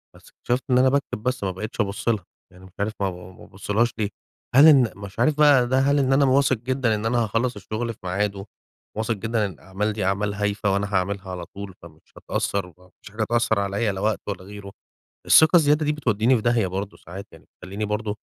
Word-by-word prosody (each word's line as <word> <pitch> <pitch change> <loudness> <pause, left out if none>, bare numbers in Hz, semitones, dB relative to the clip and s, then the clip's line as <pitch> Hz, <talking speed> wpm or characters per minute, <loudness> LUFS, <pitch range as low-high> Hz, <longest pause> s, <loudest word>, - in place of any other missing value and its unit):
بس - - -18
اكتشفت 125 +2 -3
إن 125 - +4
أنا 130 +1 +5
باكتب 140 -5 -2
بس 125 -4 -2
ما 95 - -1
بقيتش 105 +5 -4
أبُص 100 +2 -4
لها. 105 -5 0 0.3
يعني 90 +1 -16
مش 95 - -16
عارف 105 +2 -1
ما 100 -1 0
ب - - -7
ب 90 0 -12
ب - - -21
بابُصّلهاش 110 +5 -2
ليه. 105 -2 -1 0.5
هل 145 +4 +9
إن 135 -5 +7
أنا - - -15
مش 100 +2 -9
عارف 145 +5 +3
بقي 145 -5 +5
ده 130 +1 +2
هل 140 +1 +2
إن 135 -1 +2
أنا 140 +1 +4
واثق 135 -1 +3
جدًا 125 -1 0
إن 105 +1 -4
أنا 120 0 +1
هاخلّص 115 +3 -1
الشغل 110 +3 -4
في - - -25
ميعاده، 100 +1 -2 0.5
واثق 110 +1 0
جدًا 110 +1 -1
إن 100 - -4
الأعمال 95 +5 -4
دي 105 -3 -3
أعمال 100 +1 0
هايفة 100 -1 -1
وأنا 100 +1 -2
هاعملها 95 +1 -1
على 90 -1 -6
طول، 100 +1 -9
فمش 80 -2 -15 0.2
هتأثّر 100 -2 -2
وما 90 +1 -19
فيش 100 - -13
حاجة 110 - -5
هتأثّر 115 -2 +1
عليَّ 100 +2 -1
لا 95 - -6
وقت 110 0 0
ولا 100 -3 -5
غيره. 100 0 -10 0.6
الثقة 160 +3 +6
الزيادة 150 -1 +3
دي 150 - +1
بتودّيني 125 -3 +1
في 110 - -3
داهية 120 -4 +2
برضه 95 +2 -5
ساعات 95 +3 -10
يعني، - - -16
بتخلّيني 100 +3 -7
برضه 105 0 -3
105 Hz, 230 wpm, -23 LUFS, 100-120 Hz, 0.6 s, هل